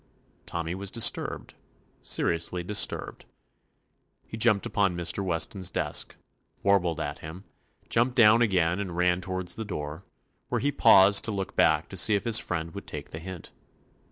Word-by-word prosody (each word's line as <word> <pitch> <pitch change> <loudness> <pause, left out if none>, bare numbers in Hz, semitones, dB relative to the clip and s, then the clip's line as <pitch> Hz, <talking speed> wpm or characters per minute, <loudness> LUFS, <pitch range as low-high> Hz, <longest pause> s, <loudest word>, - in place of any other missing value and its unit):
Tommy 85 0 -4
was 100 +1 -2
disturbed, 115 +2 +1 0.3
— - - -38
seri - - +2
ously 85 +2 -3
disturbed. 105 +3 -1 1.0
He - - -8
jumped 110 -3 +2
upon 95 -3 0
Mr. 85 +3 -1
Weston's 90 +1 -2
desk, - - -3 0.5
warbled 90 -5 +2
at 75 -2 -4
him; 80 +5 -9 0.4
jumped 120 +2 +1
down 115 -1 +6
again 90 -5 +1
and 90 -4 -5
ran 90 0 +2
toward 95 -1 -5
the 110 +5 -3
door, 75 -4 -6 0.5
where - - 0
he 145 - 0
paused 100 -6 +6
to 115 - -2
look 95 -2 -4
back - - +3
to - - -7
see 105 - +4
if 100 - -1
his 115 -1 +4
friend 85 -1 -4
would - - -9
take - - -7
the 80 - -7
hint. 95 +1 -9
95 Hz, 165 wpm, -27 LUFS, 85-105 Hz, 1.0 s, down